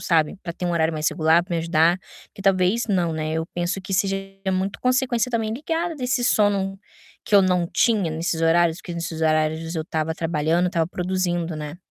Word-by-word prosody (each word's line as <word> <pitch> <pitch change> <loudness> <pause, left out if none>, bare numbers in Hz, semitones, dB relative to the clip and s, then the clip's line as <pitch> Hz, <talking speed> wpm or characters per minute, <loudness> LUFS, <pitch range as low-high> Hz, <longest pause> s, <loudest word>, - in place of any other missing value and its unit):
sabe, 165 +2 +1
pra 170 - -5
ter 180 - -7
um - - 0
horário 160 -1 +1
mais 155 0 +1
regular, 160 +1 +3
pra 180 - -8
me - - 0
ajudar. 165 +2 +3 0.4
Que - - -12
talvez 195 +3 +2
não, 175 -4 +1
né, 155 0 -3
eu 160 0 -1
penso 175 +2 -1
que 195 - -6
seja 195 +1 +1 0.4
muito 190 +2 -2
consequência 255 -1 +1
também 225 -2 -1
ligada 325 +6 -2
desse 250 -2 -1
sono 200 -3 +2 0.5
que 215 - -1
eu 200 - +8
não 180 -2 +2
tinha 210 -8 +2
nesses 165 +1 -2
horários, 165 +1 +3
que 175 - -7
nesses 165 -1 -4
horários 160 +1 +1
eu 160 - -1
estava 160 0 -2
trabalhando, 165 +2 0
estava 170 -2 0
produzindo, 175 -1 -2
né? 150 +1 -6
175 Hz, 195 wpm, -23 LUFS, 160-195 Hz, 0.5 s, eu